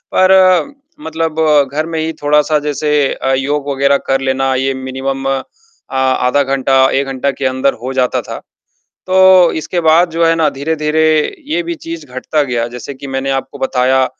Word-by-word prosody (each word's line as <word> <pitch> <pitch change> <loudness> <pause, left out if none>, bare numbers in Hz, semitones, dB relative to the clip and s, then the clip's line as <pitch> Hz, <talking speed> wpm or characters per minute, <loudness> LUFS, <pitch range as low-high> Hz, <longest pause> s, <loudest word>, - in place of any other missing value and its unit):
पर 185 +7 +4 0.3
मतलब 160 -1 -3 0.3
घर 155 +2 -2
में 165 -1 -4
ही 160 +1 -2
थोड़ा-सा 150 +1 +2
जैसे 150 0 -3 0.2
अ, 135 - -2
योग 145 +1 -2
वग़ैरह 140 +1 +2
कर 135 0 +1
लेना, 135 0 0
ये 135 +1 0
मिनिमम 135 +1 -4
अ, 135 -1 -1 0.5
आधा 130 +1 +1
घंटा, 135 0 +2
1 135 +1 0
घंटा 135 +1 -2
के 135 - -5
अंदर 130 +1 +1
हो 130 +1 -4
जाता 125 -1 0
था, - - -8 0.7
तो 185 -1 +5
इसके 175 +3 -2
बाद 165 +2 +3
जो 165 +1 0
है 165 - +3
ना 160 -2 +2
धीरे-धीरे 155 +2 -1 0.4
ये 340 +3 -1
भी 340 0 -4
चीज 165 - -8
घटता 140 +4 -1
गया, 120 -3 -2
जैसे 125 +3 -8
कि 140 +1 -10
मैंने 135 0 -3
आपको 135 +1 -4
बताया, 130 0 +1
140 Hz, 175 wpm, -14 LUFS, 135-160 Hz, 0.7 s, तो